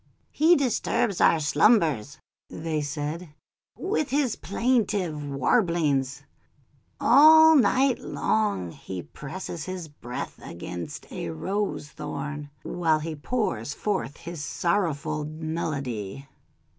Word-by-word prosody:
"He 325 +3 +5
disturbs 240 - 0
our 165 - +5
slumbers," 150 - +3 0.3
they 155 -1 -3
said, 150 +2 -4 0.4
"'with 365 -7 -1
his 270 -3 +1
plaintive 200 - 0
warblings. 145 - +1 0.8
All 315 +5 +8
night 265 -1 +3
long 205 - -1
he 90 0 -7
presses 170 +2 -7
his 185 -3 -5
breast 125 -4 -7
against 85 0 -7
a - - -4
rose 190 - -3
thorn, 150 -1 -6
while 165 -3 +1
he 155 +1 -4
pours 150 - -2
forth 190 -9 -2
his 170 -3 -7
sorrowful 155 -4 -1
melody." 145 - -4
160 Hz, 100 wpm, -26 LUFS, 145-215 Hz, 0.8 s, All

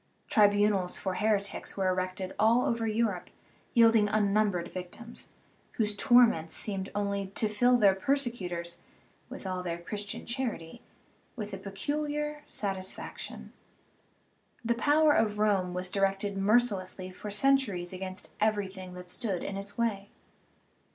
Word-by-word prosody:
Tribunals 205 -3 +3
for 190 - -2
heretics 205 0 -1
were 190 -1 +1
erected 185 +1 -2
all 230 +3 +4
over 230 -1 0
Europe, 215 -4 -1 0.5
yielding 225 -3 +5
unnumbered 205 -4 +1
victims, 185 +6 -9 0.4
whose 210 -2 -1
torments 230 -9 +4
seemed 195 -2 -2
only 200 -1 -1
to 220 - +3
fill 245 +4 +3
their 200 -4 +5
persecutors, 190 -7 -2 0.5
with - - -9
all 185 -1 -2
their 170 -2 -3
Christian 205 +4 -6
charity, 235 -10 -4 0.5
with 210 -4 -6
a - - -3
peculiar 295 +9 -3
satisfaction. 190 -2 -5 1.1
The 235 - +3
power 295 +5 +4
of 215 -6 +2
Rome 200 -4 +2
was 180 0 -2
directed 195 0 0
mercilessly 195 -3 +1
for 210 +3 -8
centuries 205 -6 +2
against 185 0 -6
everything 190 -4 -1
that 180 0 -8
stood 195 -6 -2
in 200 - -4
its 200 +2 -7
way. 210 -4 -1
205 Hz, 125 wpm, -30 LUFS, 185-230 Hz, 1.1 s, yielding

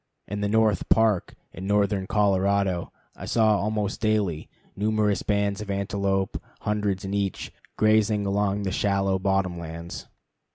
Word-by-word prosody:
In 105 +1 -4
the 100 - 0
North 110 -3 +2
Park 110 -5 +2 0.2
in 95 +3 -6
northern 100 -2 +1
Colorado, 100 -3 +1 0.2
I - - -8
saw 110 -2 +3
almost 105 -1 -2
daily 105 -7 0 0.3
numerous 105 0 +1
bands 100 0 0
of 105 - -7
antelope, 100 -1 -1 0.2
hundreds 105 -2 -1
in 95 - -4
each, 100 -2 -2 0.3
grazing 110 -1 +3
along 100 0 0
the 95 - -1
shallow 100 -1 +1
bottom 95 -2 0
lands. 85 +1 -7
100 Hz, 135 wpm, -25 LUFS, 95-105 Hz, 0.3 s, saw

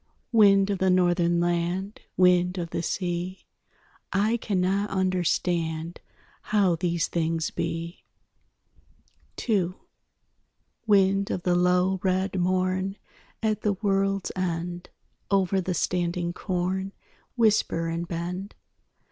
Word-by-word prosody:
Wind 200 -3 +5
of 195 - -2
the 190 - +2
Northern 175 -1 +3
land, 175 +4 -1 0.2
Wind 180 0 +4
of 170 -2 -4
the - - -2
sea, 175 +1 -3 0.7
I 210 +4 +2
cannot 200 -1 0
understand 175 -3 -1 0.4
How 200 -5 +2
these 170 -1 0
things 165 -1 -1
be. 165 +1 -4 1.4
II 185 -5 +1 1.1
Wind 195 -1 +3
of 180 - -3
the 180 - +2
low 180 +1 +2
red 190 0 0
morn 185 +2 0 0.5
At 215 -1 0
the 210 - +1
world's 195 -1 0
end, 175 -1 -3 0.4
Over 195 -1 +2
the 180 0 -2
standing 175 0 -1
corn 190 +1 -2 0.4
Whisper 215 -7 +2
and 170 +1 -3
bend. 180 +4 -5
185 Hz, 105 wpm, -26 LUFS, 175-195 Hz, 1.4 s, Wind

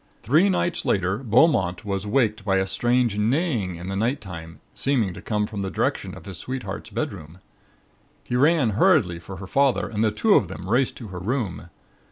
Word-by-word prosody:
"Three 155 - +4
nights 175 -2 0
later 95 +1 0
Beaumont 115 - +2
was 100 0 -3
waked 110 -2 +1
by 100 -1 +1
a 95 - +1
strange 120 +2 +1
neighing 115 - 0
in 85 +2 -8
the 95 - -3
nighttime 95 - -3
seeming 120 -9 0
to - - -10
come 105 -2 -1
from 105 -1 -5
the 95 - -2
direction - - -2
of - - -13
his 95 -5 -8
sweetheart's 130 -1 -5
bedroom. 80 +2 -5 0.9
He 120 - -3
ran 145 -2 +3
hurriedly 110 - +3
for 90 +3 -9
her 100 - -8
father 135 +5 +2
and 110 -1 -1
the 110 - +4
two 205 - +2
of 100 - +4
them 95 0 -8
raced 125 +5 +1
to 115 -5 -8
her 90 -1 -6
room. 100 -5 -3
105 Hz, 190 wpm, -24 LUFS, 95-130 Hz, 0.9 s, Three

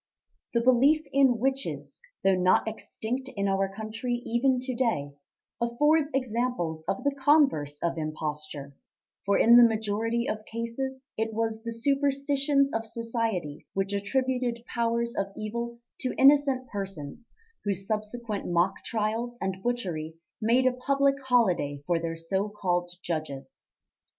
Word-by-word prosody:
The 235 - +4
belief 270 +6 +4
in 270 -3 +5
witches, 270 - -2 0.2
though 195 - +5
not 185 +3 +3
extinct 235 +4 -4
in 200 0 +1
our 195 0 +1
country 220 +4 -3
even 250 +3 +2
to 255 0 -3
day, 230 - 0 0.5
affords 295 +6 +3
examples 235 -10 -1
of 195 - -1
the 285 -1 +1
converse 270 - +3
of 170 -1 0
imposture, 150 -2 -5 0.5
for 200 - +4
in 235 +1 +7
the 245 - +10
majority 225 +1 +1
of 215 0 -3
cases 260 +4 -4
it 220 0 -2
was 225 0 -1
the 230 0 -5
superstitions 275 +2 +1
of 225 - 0
society 225 - -3
which 195 +1 -1
attributed 245 +2 -1
powers 235 0 -1
of 195 - 0
evil 235 +2 -4 0.2
to 255 - -2
innocent 275 -2 +5
persons 195 - -6 0.3
whose 195 -2 -2
subsequent 215 0 -3
mock 175 +2 +1
trials 230 +2 -2
and 190 0 -3
butchery 180 -10 -2 0.3
made 240 +4 +3
a 255 - +4
public 275 +2 +1
holiday 180 - +2
for 175 0 +1
their 165 0 -3
so 190 +5 -1
called 175 -4 -1
judges. 140 -5 -5
230 Hz, 135 wpm, -28 LUFS, 195-255 Hz, 0.5 s, the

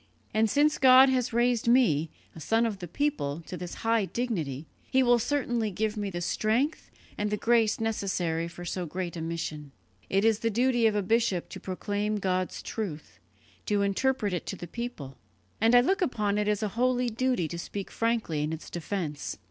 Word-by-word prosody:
And 220 0 +3
since 295 +6 +3
God 260 0 +8
has 255 -2 +1
raised 240 0 +1
me, 195 - +4 0.3
a - - -9
son 225 +9 +2
of 210 -4 -3
the 175 - -6
people, 170 - -1
to - - -6
this 175 0 -6
high 225 -2 +3
dignity, 165 - -3 0.2
He 265 0 +3
will 240 -1 +4
certainly 240 -4 0
give 215 +3 -2
me 205 -2 -2
the 175 -2 -5
strength 230 - 0 0.3
and 210 0 0
the 210 - -1
grace 225 -1 +2
necessary 185 -7 -1
for 175 +1 -9
so 175 0 -3
great 180 +2 -4
a 165 - -5
mission. 160 -3 -4 0.4
It 195 +2 +2
is 225 -1 +3
the 230 - 0
duty 240 +1 +3
of 215 - +1
a 205 - +1
bishop 225 -3 +1
to - - -8
proclaim 205 +3 -2
God's 185 -2 -1
truth, 180 -9 -6 0.5
to 205 -1 +2
interpret 210 +1 0
it 175 - -3
to - - -3
the 175 - -7
people; 170 - -7 0.4
and 225 +2 +5
I 245 - +8
look 385 - +1
upon 210 - 0
it 210 - 0
as 210 0 0
a 210 - 0
holy 245 +2 +1
duty 240 -6 0
to 170 - -5
speak 200 +2 -6
frankly 230 -10 0
in 150 +1 -1
its 160 0 -7
defence. 170 -4 -4
210 Hz, 195 wpm, -28 LUFS, 175-240 Hz, 0.5 s, God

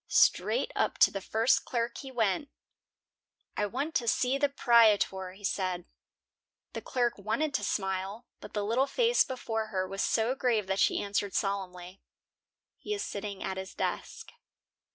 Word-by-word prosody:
Straight - - +3
up - - 0
to - - +6
the 195 - -4
first 225 +5 +2
clerk 235 -1 -2
he 270 - -8
went. 230 +2 0 1.1
"I 210 - 0
want 275 +9 -3
to 235 - -4
see 255 +4 +2
the 285 0 +3
'prietor," 215 -8 +3
he 200 +2 -17
said. 185 -3 -1 0.9
The - - -5
clerk 240 -4 -1
wanted 230 +9 -1
to - - 0
smile, 195 +3 -2
but - - -11
the 205 -1 -1
little 245 +6 +2
face 475 - +3
before 225 -4 -3
her 185 -3 -2
was 195 +1 -4
so 230 +2 +1
grave 240 -6 +1
that 190 +1 -1
she - - +3
answered 200 0 -2
solemnly, 190 -2 -3 0.8
"He 420 - -3
is 405 - -3
sitting 200 -1 -5
at 190 - -3
his 190 0 -7
desk." - - -4
215 Hz, 160 wpm, -30 LUFS, 195-250 Hz, 1.1 s, to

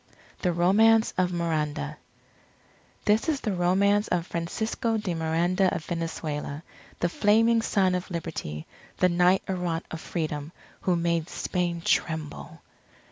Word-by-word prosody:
THE 180 - +2
ROMANCE 220 +6 +4
OF 180 -1 +2
MIRANDA 155 - -2 1.1
This 215 +8 +3
is 290 -3 0
the 210 - -1
romance 200 +4 +3
of 175 -2 0
Francisco 220 +7 -2
de 210 -5 -2
Miranda 170 +4 +1
of 155 - -5
Venezuela, 155 -3 -4 0.4
the 175 - +3
Flaming 225 +5 +3
Son 190 -4 +2
of 180 +1 -2
Liberty, 160 - -5 0.3
the 185 - +4
Knight 180 +2 +3
Errant 180 -3 -2
of 160 - -5
Freedom, 155 -2 -3 0.3
who 180 - +1
made 170 -1 0
Spain 175 -2 -2
tremble. 160 -3 -1
175 Hz, 130 wpm, -27 LUFS, 165-195 Hz, 1.1 s, ROMANCE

